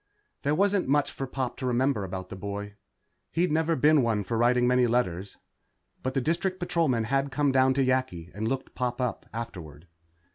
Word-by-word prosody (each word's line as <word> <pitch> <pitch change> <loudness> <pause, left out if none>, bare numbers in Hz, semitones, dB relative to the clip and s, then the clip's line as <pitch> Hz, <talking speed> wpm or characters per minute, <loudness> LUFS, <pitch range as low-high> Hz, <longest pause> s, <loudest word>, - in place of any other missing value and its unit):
There 145 +2 +1
wasn't 200 0 +2
much 145 +1 +2
for 135 - -5
Pop 130 -1 -3
to 130 - -4
remember 125 -2 +1
about 95 0 -6
the - - -6
boy. 100 +1 -5 0.6
He'd 170 0 +1
never 160 +1 +2
been 150 +2 +5
one 110 -4 +1
for 115 - -3
writing 120 +2 +3
many 125 0 +4
letters. 100 -6 -1 0.6
But 130 +1 -3
the 135 - +2
District 175 +6 -1
Patrolman 160 -9 +1
had 135 +4 0
come 145 0 +2
down 130 0 +4
to 135 -1 +2
Yakki 130 -10 -1
and 110 +2 -3
looked 130 +2 -3
Pop 125 0 -2
up 125 -5 -2
afterward. 90 -10 -7
125 Hz, 185 wpm, -27 LUFS, 110-140 Hz, 0.6 s, been